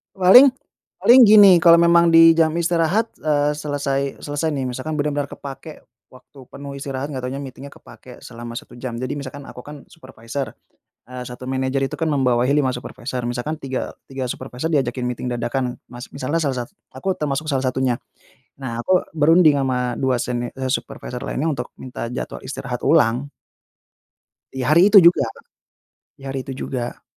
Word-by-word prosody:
Paling 195 +9 +8 0.5
paling 250 +2 +6
gini, 200 -4 +8
kalau 170 0 +7
memang 170 0 +5
di 165 0 +7
jam 160 -1 +2
istirahat, 170 +6 0
eee, 150 -1 +1
selesai 140 -2 -3
selesai 145 +2 -2
nih, 145 -4 -2
misalkan 130 +5 -4
bener-bener 145 -1 -1
kepakai 140 +3 -10 0.2
waktu 130 +2 -18
penuh 140 0 -9
istirahat, 135 +1 -5
nggak 130 - -4
tahunya 130 +3 -5
meeting-nya 135 +1 -10
kepakai 130 -2 -15
selama 120 -1 -9
1 120 - -10
jam. 120 -2 -5
Jadi, 130 +4 -4
misalkan 140 +1 -8
aku 125 - -11
kan 145 +2 -11
supervisor, 130 -4 -7 0.5
eee, 125 0 -7
1 125 +1 -9
manajer 130 +1 -1
itu - - -7
kan 160 -2 -1
membawahi 125 -2 +1
5 140 -3 +1
supervisor, 125 0 -6
misalkan 120 +6 -3
tiga 135 -4 -5 0.2
tiga 130 -1 -4
supervisor 130 +3 -5
diajakin 130 -5 -1
meeting 125 0 -4
dadakan, 125 +1 -3
Mas. 120 0 -11
Misalnya 145 +5 -2
salah 130 -4 -2
sat - - -28 0.2
aku 190 -1 -3
termasuk 150 +1 -3
salah 135 -3 -1
satunya. 130 -1 0 0.6
Nah, 120 -4 -5
aku 185 +9 +1
berunding 155 -1 +4
sama 125 -2 -2
2 130 -1 +1
seni 120 0 -3
eee, 130 -1 -4
supervisor 125 0 -5
lainnya, 140 - -2
untuk 125 -3 -5
minta 125 -2 -7
jadwal 125 +2 -6
istirahat 125 -2 -6
ulang. 125 -2 +3 1.3
Ya, 130 +1 -2
hari 175 +6 +5
itu 200 - +11
juga. 170 -5 +5 0.9
Di 135 - -20
hari 135 0 -4
itu 135 - -6
juga. 120 -2 -5
135 Hz, 165 wpm, -21 LUFS, 125-155 Hz, 1.3 s, itu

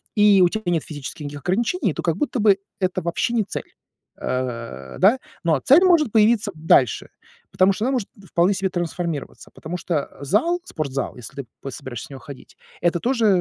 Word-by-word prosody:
у 205 -4 +6
тебя 220 +4 -4
нет 165 -3 +1
физических 145 0 -7
никаких 145 0 -7
ограничений, 225 - 0
то - - -4
как 165 -2 0
будто 280 -4 -1
бы 205 -2 +5 0.2
это 185 -1 -1
вообще 170 +8 -1
не 225 - +3
цель. 200 - -7 0.5
Э, 115 - -4
да, 215 +8 +5 0.2
но 160 -4 +2
цель 285 - +6
может 335 - +4
появиться 220 -1 +3
дальше, 145 -6 +3 0.4
потому 185 +1 +4
что 210 +3 -2
она 260 - +1
может 245 -7 -1 0.2
вполне 180 +4 +3
себе 190 0 -1
трансформироваться, 170 -3 -4
потому 170 +3 -6
что 165 -4 -3
зал, 220 - +1
спортзал, 140 - -4
если 135 +4 -8
ты, - - -25
п 140 - -5
собираешься 120 -2 -7
в - - -25
него 135 - -8
ходить, 140 -2 -12 0.2
это 175 0 +2
тоже 235 +1 +1
180 Hz, 185 wpm, -22 LUFS, 145-220 Hz, 0.5 s, у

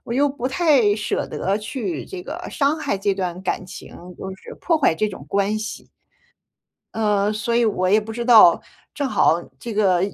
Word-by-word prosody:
我 235 - -5
又 285 +3 +3
不 260 -2 -4
太 270 -8 +3
舍 210 - -2
得 195 +2 -1
去 260 - -4
这 380 -2 -7
个 - - -7
伤 290 +1 +1
害 275 -10 -2
这 195 0 0
段 185 -2 -4
感 185 - -2
情， - - -11 0.2
就 190 - -6
是 - - -11
破 335 - +2
坏 270 - +3
这 215 +6 0
种 185 -8 -10
关 200 +3 0
系。 215 0 -7 1.1
呃， 210 -2 +1
所 220 +2 -2
以 240 - +3
我 185 -4 0
也 210 +3 +5
不 220 +1 -8
知 235 +1 -4
道， 220 -8 +7 0.4
正 285 -2 -1
好 170 -9 +3 0.2
这 235 - -6
个 195 -4 +2
215 Hz, 205 characters per minute, -21 LUFS, 195-260 Hz, 1.1 s, 道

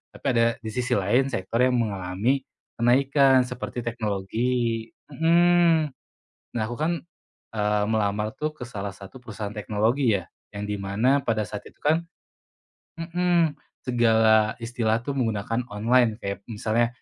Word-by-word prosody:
Tapi - - -15
ada 115 -1 +4 0.2
di 110 - -4
sisi 125 0 0
lain, 110 +8 +2
sektor 95 +4 -2
yang 125 0 +3
mengalami 105 +4 0 0.4
kenaikan, 135 +2 +4
seperti 125 0 -6
teknologi, 115 +1 -1 0.2
mhm. 170 -2 +4 0.6
Nah, 120 - -2
aku 120 - -5
kan, 155 +6 0 0.6
eee, 105 -1 +1
melamar 105 +1 0
tuh, 155 +2 -2
ke 125 - -11
salah 100 -4 -5
satu 100 +6 -12
perusahaan 105 -2 -6
teknologi, 110 +4 +1
ya. 85 - -10 0.3
Yang 100 - -4
di - - -2
mana 110 +8 +2
pada 110 -3 0
saat 105 -1 -6
itu, - - -32
kan 160 +3 +2 1.0
mhm, 170 -1 +1 0.3
segala 110 -3 +4
istilah 115 -1 0
tuh, 140 - -2
menggunakan 115 -2 -1
online. 110 +2 +2
Kayak 100 -3 -5
misalnya, 115 +2 +1
115 Hz, 140 wpm, -25 LUFS, 105-130 Hz, 1.0 s, ada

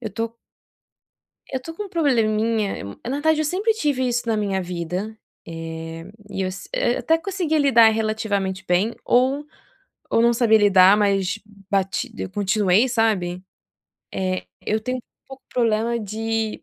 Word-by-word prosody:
Eu 220 - -4
tô 230 +1 -4 1.2
eu 260 - -2
tô 325 +5 -8
com 415 - -5
um 400 - -9
probleminha, 225 - +1 0.2
na 250 - -3
verdade, 310 +1 +2
eu - - +1
sempre 395 +8 +1
tive 285 -11 0
isso 240 0 -1
na 220 - +2
minha 195 -3 -1
vida. 180 +5 -4 0.3
Eh, 165 0 -7 0.3
e 195 -1 -2
as 185 +1 -6
eu 240 - +1
até 320 +7 +2
conseguia 350 -4 -1
lidar 245 -6 +6
relativamente 215 -4 -1
bem 185 +6 +1
ou 265 +4 +2 0.6
ou - - +3
não 235 0 +5
sabia 225 -2 +4
lidar, 195 -1 +6
mas 200 0 +1 0.3
bati 200 +5 -1
eu - - -4
continuei, 205 +3 +2
sabe, 205 -7 0 0.7
eh, 95 -1 -2 0.2
eu 215 - 0
tenho 255 +3 -3
um - - -11 0.2
pouco 270 0 -12
problema 230 0 +1
de, 220 +1 -3
220 Hz, 150 wpm, -22 LUFS, 195-255 Hz, 1.2 s, lidar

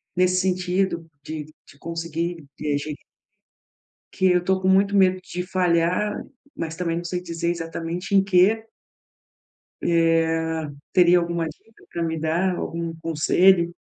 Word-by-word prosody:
nesse 185 0 +3
sentido 185 -1 0 0.2
de 155 -1 -5 0.2
de 145 - -18
conseguir, 165 -1 -4
de 150 -1 -1
a - - +2
gente 150 +1 -6 1.1
que 190 - +1
eu 180 0 +1
tô 190 0 +1
com 190 - 0
muito 200 +1 +4
medo 185 -1 +4
de 180 0 -5
falhar, 180 +2 +1 0.4
mas, 165 0 -4
também, 170 -2 -1
não 175 - -4
sei 180 +1 -3
dizer, 170 -1 -3
exatamente, 170 +2 -4
em 195 - +6
quê. 200 +4 +3 1.2
Eh, 165 -1 +1 0.2
teria 180 0 +6
alguma 170 -1 -1
dica 220 +8 -16
para 170 - -2
me 160 -1 -1
dar, 165 +4 +1
algum 165 0 -4
conselho? 170 +2 +3
170 Hz, 145 wpm, -23 LUFS, 165-185 Hz, 1.2 s, em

